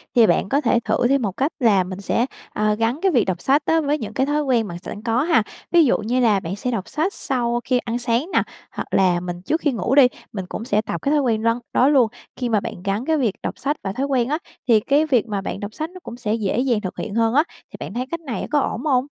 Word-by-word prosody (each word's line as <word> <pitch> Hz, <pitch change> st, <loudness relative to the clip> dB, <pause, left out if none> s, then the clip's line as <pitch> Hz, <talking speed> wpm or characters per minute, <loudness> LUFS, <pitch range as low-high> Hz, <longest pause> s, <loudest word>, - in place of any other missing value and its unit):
thì 235 Hz, -3 st, +6 dB
bạn 180 Hz, +2 st, +2 dB
có 280 Hz, +5 st, +2 dB
thể 235 Hz, -, +3 dB
thử 240 Hz, -, +2 dB
thêm 275 Hz, 0 st, +3 dB
một 205 Hz, -4 st, -1 dB
cách 280 Hz, +4 st, +1 dB
là 210 Hz, -7 st, +4 dB
mình 185 Hz, +2 st, -7 dB
sẽ, 230 Hz, +4 st, +1 dB, 0.3 s
ờ, 210 Hz, 0 st, +1 dB
gắn 230 Hz, +6 st, 0 dB
cái 385 Hz, -, +3 dB
việc 245 Hz, -9 st, +3 dB
đọc 180 Hz, -2 st, -2 dB
sách 280 Hz, +3 st, +2 dB
á 325 Hz, 0 st, +3 dB
với 295 Hz, 0 st, 0 dB
những 215 Hz, -6 st, -6 dB
cái 265 Hz, -, +1 dB
thói 295 Hz, +1 st, 0 dB
quen 240 Hz, -6 st, +1 dB
bạn 170 Hz, -2 st, -6 dB
s -, -, -19 dB
sẵn 205 Hz, -, -6 dB
có 230 Hz, +2 st, +1 dB
ha. 320 Hz, -8 st, +3 dB, 0.3 s
Ví 340 Hz, -2 st, +6 dB
dụ 250 Hz, -, +3 dB
như 235 Hz, +4 st, -1 dB
là 220 Hz, -5 st, +4 dB
bạn 185 Hz, +1 st, -5 dB
sẽ 250 Hz, +5 st, -3 dB
đọc 210 Hz, -5 st, -3 dB
sách 315 Hz, +8 st, -1 dB
sau 240 Hz, -2 st, -1 dB
khi 255 Hz, -, +1 dB
ăn 235 Hz, 0 st, -3 dB
sáng 240 Hz, +6 st, 0 dB
nà, -, -, +3 dB, 0.3 s
hoặc -, -, -5 dB
là 180 Hz, -2 st, +3 dB
mình 175 Hz, 0 st, -6 dB
trước 320 Hz, -, -1 dB
khi 290 Hz, -, +2 dB
ngủ 235 Hz, +2 st, 0 dB
đi, 275 Hz, -3 st, +8 dB, 0.3 s
mình 190 Hz, -3 st, -4 dB
cũng 225 Hz, -, -5 dB
sẽ 215 Hz, -3 st, +2 dB
tập 170 Hz, -6 st, -5 dB
cái 280 Hz, -, 0 dB
thói 300 Hz, -, +4 dB
quen 225 Hz, -4 st, 0 dB
răn 230 Hz, +1 st, +2 dB
đó 255 Hz, -, +4 dB
luôn, 265 Hz, -6 st, +5 dB, 0.3 s
khi 250 Hz, -2 st, -2 dB
mà 220 Hz, -2 st, +3 dB
bạn 180 Hz, -2 st, -7 dB
gắn 200 Hz, +5 st, -1 dB
cái 320 Hz, +1 st, +2 dB
việc 235 Hz, -9 st, +1 dB
đọc -, -, -4 dB
sách 290 Hz, +3 st, -1 dB
và 195 Hz, -, -2 dB
thói 265 Hz, +6 st, -1 dB
quen 260 Hz, -3 st, +1 dB
á, 300 Hz, -, +1 dB, 0.3 s
thì 230 Hz, -3 st, +6 dB
cái 285 Hz, +8 st, +2 dB
việc 250 Hz, -7 st, +2 dB
mà 205 Hz, -2 st, -2 dB
bạn 195 Hz, -, -4 dB
đọc 205 Hz, +1 st, -6 dB
sách 315 Hz, +6 st, -4 dB
nó 370 Hz, +1 st, -12 dB
cũng 235 Hz, -, -8 dB
sẽ 225 Hz, -4 st, -2 dB
dễ 220 Hz, 0 st, 0 dB
dàng 245 Hz, -4 st, +1 dB
thực 185 Hz, -3 st, -6 dB
hiện 215 Hz, -1 st, -5 dB
hơn 225 Hz, 0 st, +2 dB
á, 295 Hz, +4 st, +5 dB, 0.3 s
thì -, -, -10 dB
bạn -, -, -6 dB
thấy 250 Hz, +2 st, -2 dB
cách 335 Hz, -, -2 dB
này 275 Hz, -8 st, -4 dB
có 295 Hz, -, +4 dB
ổn 250 Hz, -3 st, -2 dB
hông? 260 Hz, -3 st, +2 dB
240 Hz, 295 wpm, -22 LUFS, 210-275 Hz, 0.3 s, đi